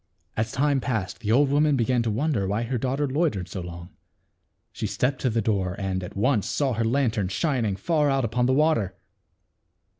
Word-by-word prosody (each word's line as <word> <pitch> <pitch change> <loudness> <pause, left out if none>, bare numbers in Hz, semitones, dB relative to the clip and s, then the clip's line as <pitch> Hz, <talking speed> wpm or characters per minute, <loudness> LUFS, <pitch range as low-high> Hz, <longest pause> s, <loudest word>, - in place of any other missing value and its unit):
As 110 0 -1
time 140 0 +2
passed 110 -8 -3
the 110 -2 -2
old 140 +4 +4
woman 150 0 +3
began 125 0 +1
to 115 - -1
won 140 +10 0
der 100 -9 0
why 105 +4 -1
her 120 +1 -2
daughter 135 +4 0
loitered 135 - 0
so 95 - -5
long. 85 0 -8 0.8
She - - -3
stepped 130 +1 -1
to 130 - +2
the 115 -1 0
door, 95 -4 0
and, 95 -1 -2
at 90 - -8
once, 110 -1 +2
saw 140 -3 0
her 115 +1 0
lan 125 +1 +2
tern 100 -4 -1
shining 115 - 0
far 150 - +1
out 135 -2 +1
upon 120 +2 +1
the 130 - +3
water. 135 - +2
120 Hz, 205 wpm, -25 LUFS, 100-140 Hz, 0.8 s, old